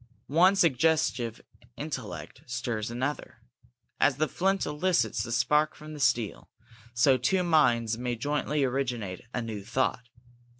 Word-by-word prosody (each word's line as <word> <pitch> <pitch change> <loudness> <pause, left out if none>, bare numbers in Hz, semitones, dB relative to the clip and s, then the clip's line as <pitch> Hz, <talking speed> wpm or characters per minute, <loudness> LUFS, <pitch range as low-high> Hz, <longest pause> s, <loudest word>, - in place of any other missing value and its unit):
One 180 +7 +4
suggestive 155 - +1 0.4
intellect - - -6
stirs 110 -2 -3
another. 130 +5 -4 0.6
As 135 - +4
the 155 +1 +1
flint 195 +4 0
elicits 150 -6 0
the 115 - -5
spark 150 +6 +2
from 155 0 -10
the 150 - -8
steel, 115 -6 0 0.5
so 130 +2 +5
two 180 +10 +1
minds 120 -9 +2
may 125 -1 -2
jointly 145 +3 -1
originate 125 -8 -2
a 125 - -3
new 110 -3 -5
thought. 125 +2 -1
130 Hz, 130 wpm, -28 LUFS, 120-155 Hz, 0.6 s, so